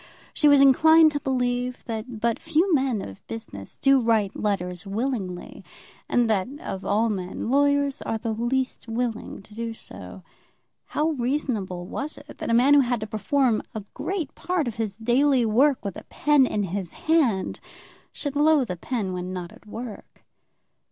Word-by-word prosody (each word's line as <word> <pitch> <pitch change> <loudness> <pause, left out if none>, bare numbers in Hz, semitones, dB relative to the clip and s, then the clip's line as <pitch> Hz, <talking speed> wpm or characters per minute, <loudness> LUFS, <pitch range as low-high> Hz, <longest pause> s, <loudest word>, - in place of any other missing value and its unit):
She 300 - +3
was 285 -1 +7
inclined 315 +4 +7
to 290 - -2
believe 250 -2 -1
that 225 0 -5
but 235 -1 +1
few 330 +3 +1
men 260 -7 +1
of 95 0 -10
business 100 - -8
do 275 -1 +4
write 225 -4 +1
letters 180 -4 -2
willingly, 200 -4 -3 0.5
and 240 -1 +3
that, 200 -4 +1
of 190 -9 -6
all 215 +3 +2
men, 195 +2 -3
lawyers 285 0 +2
are 225 - -2
the 225 +1 -3
least 240 +3 -1
willing 230 -3 -3
to 210 - -16
do 230 +1 -4
so. - - -10 0.6
How 305 +2 0
reasonable 240 - -2
it 180 - -11
was 295 +2 -4
that - - -6
a - - +1
man 250 +5 +5
who 290 - +7
had 245 -3 +1
to - - -2
perform 225 +3 +1
a 215 - -4
great 360 -7 -3
part 355 -6 -1
of 225 - -5
his 215 -3 -3
daily 250 +2 +3
work 255 +3 +3
with 200 - -3
a - - -8
pen 295 -3 +3
in 210 -3 -1
his 190 -1 -4
hand, 280 - +1 0.5
should 285 -2 -4
loathe 295 -6 +3
a 180 - -4
pen 205 -2 -3
when 180 0 -4
not 180 -2 -5
at - - -18
work. 225 0 -9
240 Hz, 170 wpm, -25 LUFS, 210-280 Hz, 0.6 s, was